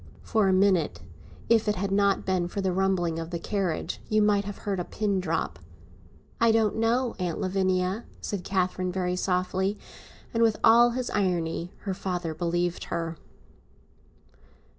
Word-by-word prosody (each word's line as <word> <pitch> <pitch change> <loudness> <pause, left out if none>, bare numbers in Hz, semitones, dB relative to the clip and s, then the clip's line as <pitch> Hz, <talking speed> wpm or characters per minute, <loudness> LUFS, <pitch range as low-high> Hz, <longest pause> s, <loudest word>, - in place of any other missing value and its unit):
For 215 -4 +2
a - - +4
minute, 185 - +2 0.5
if 225 -2 +3
it 210 - +2
had 195 +1 -2
not 200 0 +2
been 185 -2 +1
for 190 - -5
the 190 -2 0
rumbling 180 -3 +1
of 165 0 -5
the 170 - -3
carriage, 185 -1 -2
you 215 - +3
might 205 -1 +3
have 205 -1 -6
heard 195 -2 -3
a - - -1
pin 200 +1 -1
drop. 160 - -2 0.8
"I 230 -1 +5
don't 220 -2 +2
know, 230 +2 +1
Aunt 175 -3 -2
Lavinia," 185 +2 0
said 200 -4 -4
Catherine, 185 -1 -1
very 180 -1 -1
softly. 185 +2 0 0.6
And, 230 - +1
with 225 -2 +4
all 235 +2 +7
his 250 -1 -2
irony, 175 -3 -1
her 195 - -3
father 180 -3 -3
believed 175 +2 -1
her. 165 -1 -3
190 Hz, 160 wpm, -27 LUFS, 180-205 Hz, 0.8 s, all